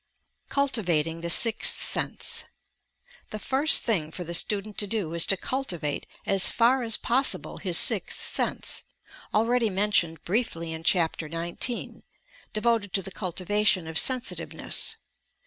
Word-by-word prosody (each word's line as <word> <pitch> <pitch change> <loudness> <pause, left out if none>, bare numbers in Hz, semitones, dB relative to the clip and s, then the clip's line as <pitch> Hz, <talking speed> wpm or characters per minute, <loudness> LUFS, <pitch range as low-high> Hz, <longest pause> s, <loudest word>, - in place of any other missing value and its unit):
CULTIVATING 175 - -1
THE 170 - -4
"SIXTH 225 +5 +6
SENSE" - - -1 0.8
The 215 - -6
first 270 +7 +3
thing 180 -10 -1
for 180 +3 -7
the 170 0 -7
student 205 +3 +1
to 205 - 0
do 195 -6 -3
is 170 -1 +3
to 195 - +2
cultivate 175 - -4 0.2
as 195 -2 +5
far 245 +3 +2
as 225 -2 +1
possible 260 +4 +1
his - - 0
"Sixth - - 0
Sense," - - -2 0.5
already 230 +1 +1
mentioned 185 -5 0
briefly 170 -5 -3
in 160 - -7
Chapter 165 -3 0
SIX 170 +5 -1 0.8
(devoted 215 -3 -1
to 195 - 0
the 195 - -9
Cultivation 190 0 -1
of 160 - -7
ADVANCED 160 - +7
STUDIES 255 -2 0
Sensitiveness). - - -5
195 Hz, 140 wpm, -25 LUFS, 170-230 Hz, 0.8 s, ADVANCED